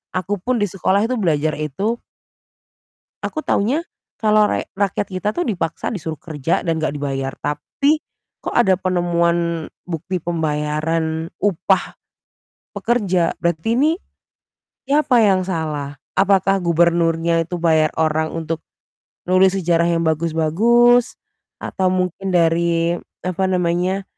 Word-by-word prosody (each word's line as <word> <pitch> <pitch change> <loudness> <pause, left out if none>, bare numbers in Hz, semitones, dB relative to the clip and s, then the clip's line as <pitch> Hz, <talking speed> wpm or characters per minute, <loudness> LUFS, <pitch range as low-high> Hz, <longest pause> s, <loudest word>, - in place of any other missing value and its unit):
aku 190 +2 -1
pun 245 +1 0
di - - +4
sekolah 195 +1 +1
itu 255 - -1
belajar 155 -4 +1
itu 175 - -2 1.3
aku 310 - -4
tahunya 270 +12 +1 0.4
kalau 215 -1 +4
rek - - -2
rakyat 200 0 0
kita 185 +3 -2
tuh 350 - 0
dipaksa 175 -6 -2
disuruh 160 -6 -4
kerja 155 -2 -1
dan 165 -2 0
enggak 150 -2 -1
dibayar. 135 -2 -3
Tapi 280 - 0 0.4
kok - - -5
ada 195 -6 +4
penemuan 170 -2 0 0.2
bukti 180 +2 -4
pembayaran 160 0 -1
upah 190 -1 0 0.8
pekerja, 190 -8 +1
berarti 170 +7 0
ini 295 +5 +3 1.0
siapa 275 -3 +3
yang 190 -3 +3
salah? 155 -6 -3 0.2
Apakah 195 0 +3
gubernurnya 170 0 +2
itu 175 +2 -5
bayar 160 -2 +3
orang 160 0 +1
untuk 165 0 -4 0.6
nulis 185 +1 +4
sejarah 170 -2 +2
yang 170 -1 +1
bagus-bagus 170 +11 +3 0.5
atau 190 -2 -1
mungkin 185 +1 -1
dari 170 0 +2 0.3
apa 185 +1 -2
namanya, 180 +1 0
170 Hz, 120 wpm, -20 LUFS, 160-195 Hz, 1.3 s, di